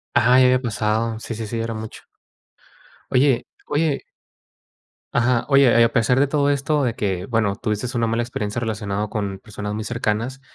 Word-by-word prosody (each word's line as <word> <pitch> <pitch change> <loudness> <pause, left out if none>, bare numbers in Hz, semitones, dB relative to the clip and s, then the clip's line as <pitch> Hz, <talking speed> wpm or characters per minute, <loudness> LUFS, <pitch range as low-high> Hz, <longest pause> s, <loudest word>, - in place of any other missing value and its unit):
Ajá, 125 +2 +5
ya 130 - +6
había 125 0 +4
pasado, 110 -1 -1
sí, 115 - -6
sí, 110 0 -5
sí, 115 +2 -4
era 115 0 -2
mucho. 110 0 -8 1.1
Oye 130 -1 +3 0.2
oye 150 -1 0 1.1
ajá, 125 -2 +2
oye, 140 0 +6 0.2
y - - +8
a 115 - +3
pesar 120 +3 +2
de 140 - +4
todo 145 0 +2
esto 145 +1 0
de 120 -3 0
que, 95 -4 -2
bueno, 110 -3 0
tuviste 105 +3 -2
una 115 - +2
mala 115 +1 0
experiencia 110 -2 -3
relacionado 105 -2 -3
con 100 -3 -3
personas 105 0 -6
muy 110 +1 -3
cercanas, 115 +3 -2
115 Hz, 175 wpm, -22 LUFS, 105-125 Hz, 1.1 s, y